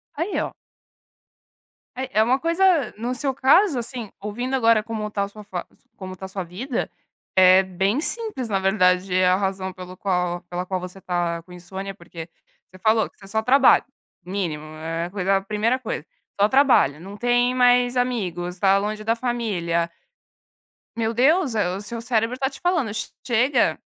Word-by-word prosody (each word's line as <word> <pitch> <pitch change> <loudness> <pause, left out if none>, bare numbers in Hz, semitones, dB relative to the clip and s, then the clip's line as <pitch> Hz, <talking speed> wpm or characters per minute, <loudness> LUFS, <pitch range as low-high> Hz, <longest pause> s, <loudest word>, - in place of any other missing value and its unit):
Aí, 340 +7 -1
ó! - - -3 1.4
Eh, 260 +1 -4
é 215 - +5
uma 255 +4 +2
coisa 335 - +2
no 240 +3 -2
seu 265 +1 -2
caso, 275 +5 +4
assim, 235 -2 -6
ouvindo 240 +6 -3
agora 230 -3 +4
como 220 -2 -4
tá 200 -1 -1
a - - -2
sua 210 +1 -12
fa 185 -4 -5 0.3
como 185 -1 -7
tá 190 - -8
a - - -5
sua 190 -1 -5
vida, 225 +9 -4 0.5
é 185 0 +7
bem 190 +6 0
simples, 420 - -2
na 195 -1 +1
verdade, 185 -1 +2
a 180 0 +5
razão 190 -1 -2
pelo 185 0 -9
qual 180 -3 -1
pela 180 +1 -3
qual 185 0 -2
você 180 +2 -9
tá 175 -2 -1
com 180 - -18
insônia, 190 +2 -7
porque 170 -3 -10 0.4
você 185 - -15
falou 220 +2 +2
que - - -37
você 195 - -14
só 220 +2 0
trabalha. 265 +3 +5 0.4
Mínimo, 180 -5 -3
eh, 165 +2 -3
coisa 195 0 +1
primeira 215 +6 0
coisa, 215 - -5 0.3
só 205 - +5
trabalha, 260 - +4
não 195 +4 -10
tem 245 +1 +2
mais 245 0 +4
amigos, 180 -8 -2
tá 195 0 +4
longe 210 +1 -3
da 225 +1 +1
família. 200 -9 -1 1.1
Meu 225 0 0
Deus! 270 +1 +3
Eh, 205 -4 +1
o 200 - -7
seu 230 +2 -6
cérebro 230 0 0
está 265 +1 -1
te 270 - -12
falando: 335 - 0
"Che 215 - -3 0.2
chega, 245 +2 +2
210 Hz, 175 wpm, -23 LUFS, 185-245 Hz, 1.4 s, é